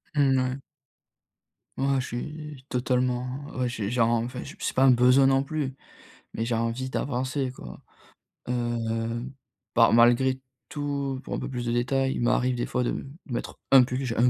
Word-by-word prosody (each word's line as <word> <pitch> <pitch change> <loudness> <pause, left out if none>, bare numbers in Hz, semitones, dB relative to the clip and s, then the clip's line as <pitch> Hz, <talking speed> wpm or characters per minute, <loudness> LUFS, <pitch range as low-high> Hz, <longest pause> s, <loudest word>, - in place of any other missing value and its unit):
Mmh,e 135 -2 +4
ouais. 130 +1 -2 1.2
Moi 135 0 +2
je 130 - -3
suis 150 +2 -7
totalement, 125 0 0 0.3
ouais 125 -1 0
j'ai 110 -3 -3
genre, 115 -2 +3
enfin 120 +2 -1
je - - -10
c'est - - -2
pas 130 - +3
un 135 - +7
besoin 125 +2 +6
non 135 0 +3
plus, 140 -3 -3 0.6
mais 115 - -1
j'ai 115 -1 0
envie 115 +3 -2
d'avancer 130 0 -2
quoi. 65 - -10 0.7
Heu, 115 -1 -1 0.5
par 115 -1 +5
malgré 120 +3 +4 0.3
tout 140 -2 -3
pour - - -6
un - - -1
peu - - -4
plus 125 -2 -4
de 120 - 0
détails 130 +3 +1
il - - -3
m'arrive 125 +1 +2
des 120 - -1
fois 125 - 0
de 125 - -3 0.2
mettre 120 -4 -5
un 135 -2 +9
pull. 130 +2 -2
J'ai 115 - -2
un 125 +2 +5
125 Hz, 175 wpm, -26 LUFS, 120-135 Hz, 1.2 s, un